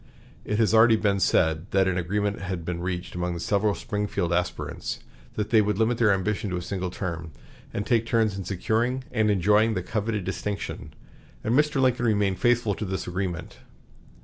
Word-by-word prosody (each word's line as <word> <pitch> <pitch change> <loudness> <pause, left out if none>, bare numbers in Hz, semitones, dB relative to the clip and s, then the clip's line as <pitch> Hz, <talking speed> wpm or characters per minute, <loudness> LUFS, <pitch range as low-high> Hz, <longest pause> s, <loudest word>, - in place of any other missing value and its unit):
It 105 - -2
has 110 -1 +3
already 110 0 +7
been 100 -2 +1
said 80 -1 +2
that 95 -1 +3
an 95 - +1
agreement 100 +4 -1
had 90 -4 -4
been 85 -1 -3
reached 90 0 -4
among 90 0 -2
the - - -5
several 100 +3 +1
Springfield 100 -4 -2
aspirants, 90 0 -2 0.4
that 105 -1 -2
they 110 -2 +6
would 105 -1 0
limit 115 +2 +1
their 110 -3 +5
ambition 100 +2 0
to 90 - -2
a - - -3
single 95 -1 -3
term, 85 -3 -5 0.4
and 100 - -3
take 115 -1 +2
turns 110 -4 +2
in 95 - -4
securing 115 +7 -1
and 110 -3 +2
enjoying 105 +3 +3
the 90 - -2
coveted 105 +1 -2
distinction; 100 +2 -4 0.5
and 110 - 0
Mr. 150 +1 +3
Lincoln 125 -2 +2
remained 100 -3 +1
faithful 120 -3 +2
to 110 - -5
this 95 0 -3
agreement. 90 -2 -4
100 Hz, 185 wpm, -26 LUFS, 90-110 Hz, 0.5 s, already